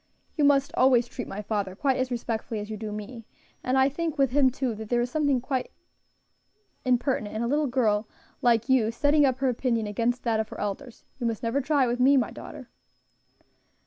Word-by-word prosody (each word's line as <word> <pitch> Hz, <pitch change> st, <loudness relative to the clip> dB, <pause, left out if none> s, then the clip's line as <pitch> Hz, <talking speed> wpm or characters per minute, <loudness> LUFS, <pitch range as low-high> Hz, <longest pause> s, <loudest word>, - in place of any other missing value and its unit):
You 300 Hz, -, +1 dB
must 280 Hz, -1 st, +3 dB
always 250 Hz, -2 st, +4 dB
treat -, -, -7 dB
my 210 Hz, +2 st, -6 dB
father 200 Hz, -3 st, -2 dB
quite 270 Hz, +4 st, +1 dB
as 255 Hz, 0 st, -1 dB
respectfully 230 Hz, -2 st, -3 dB
as 210 Hz, +1 st, -6 dB
you -, -, -3 dB
do 215 Hz, 0 st, -6 dB
me; 215 Hz, +2 st, -8 dB, 0.4 s
and 255 Hz, +1 st, +1 dB
I 265 Hz, 0 st, +5 dB
think 320 Hz, +3 st, -3 dB
with 270 Hz, -3 st, +2 dB
him, 270 Hz, -1 st, +4 dB
too, 255 Hz, -1 st, -2 dB
that 220 Hz, 0 st, -8 dB
there 240 Hz, -, +2 dB
is 240 Hz, +1 st, -1 dB
something 285 Hz, -3 st, +1 dB
quite 255 Hz, +1 st, -3 dB, 1.1 s
impertinent 250 Hz, -4 st, 0 dB
in 220 Hz, -, -1 dB
a -, -, 0 dB
little 295 Hz, +3 st, +1 dB
girl 220 Hz, -5 st, +1 dB, 0.3 s
like 230 Hz, -1 st, +3 dB
you 255 Hz, -5 st, +3 dB
setting 285 Hz, +4 st, +3 dB
up 260 Hz, -1 st, 0 dB
her 270 Hz, 0 st, 0 dB
opinion 235 Hz, -2 st, 0 dB
against 230 Hz, +4 st, -1 dB
that 225 Hz, -2 st, +1 dB
of 220 Hz, -1 st, -2 dB
her -, -, -9 dB
elders. 225 Hz, +5 st, -5 dB
You 240 Hz, -, -1 dB
must 225 Hz, 0 st, -3 dB
never 235 Hz, +5 st, 0 dB
try 280 Hz, 0 st, +2 dB
it -, -, -1 dB
with 240 Hz, +1 st, -1 dB
me, 270 Hz, +2 st, +5 dB
my 250 Hz, -, +1 dB
daughter." -, -, -10 dB
245 Hz, 210 wpm, -26 LUFS, 220-270 Hz, 1.1 s, I